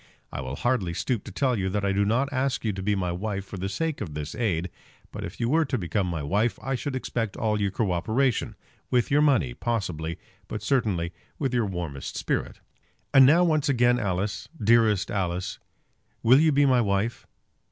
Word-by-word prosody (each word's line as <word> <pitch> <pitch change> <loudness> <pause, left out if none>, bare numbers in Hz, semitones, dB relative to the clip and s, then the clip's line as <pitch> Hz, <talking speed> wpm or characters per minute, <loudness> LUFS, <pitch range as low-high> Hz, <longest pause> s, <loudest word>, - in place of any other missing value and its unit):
I - - -4
will 65 +1 -5
hardly 100 - 0
stoop 120 +1 -1
to - - -8
tell 130 -3 +1
you 95 0 0
that 100 +1 -1
I 100 - +2
do 100 +1 +2
not 130 +7 +1
ask 135 -2 -1
you 105 - +1
to 95 - -5
be 100 +2 +1
my 90 -2 -1
wife 100 +2 -3
for 100 - -8
the 95 +2 -3
sake 160 +7 -2
of 80 -8 -5
this 75 0 -4
aid; 90 -7 -1 0.4
but - - -6
if - - -7
you 115 - 0
were 160 +6 +3
to 135 -2 -1
become 95 0 -1
my 85 -4 -3
wife 105 +10 +1
I 135 +5 -3
should 135 +1 -3
expect 115 -4 -3
all 105 -1 0
your 100 - +2
cooperation; 110 +5 0 0.3
with 125 0 +1
your 145 +1 +4
money, 120 - +3
possibly, 85 - -3 0.3
but 105 -1 -5
certainly 100 -9 0 0.2
with 135 -4 -1
your 120 -4 +1
warmest 85 -7 -5
spirit. - - -2 0.5
And 135 -2 +8
now, 165 +5 +6
once 155 -4 +2
again, 120 -2 +3
Alice, 100 +1 -2
dearest 110 -2 +3
Alice, 90 -2 -2 0.6
will 125 +4 +7
you 160 0 +4
be 145 0 +4
my 130 -3 +4
wife? 100 +2 -1
105 Hz, 200 wpm, -26 LUFS, 95-130 Hz, 0.6 s, And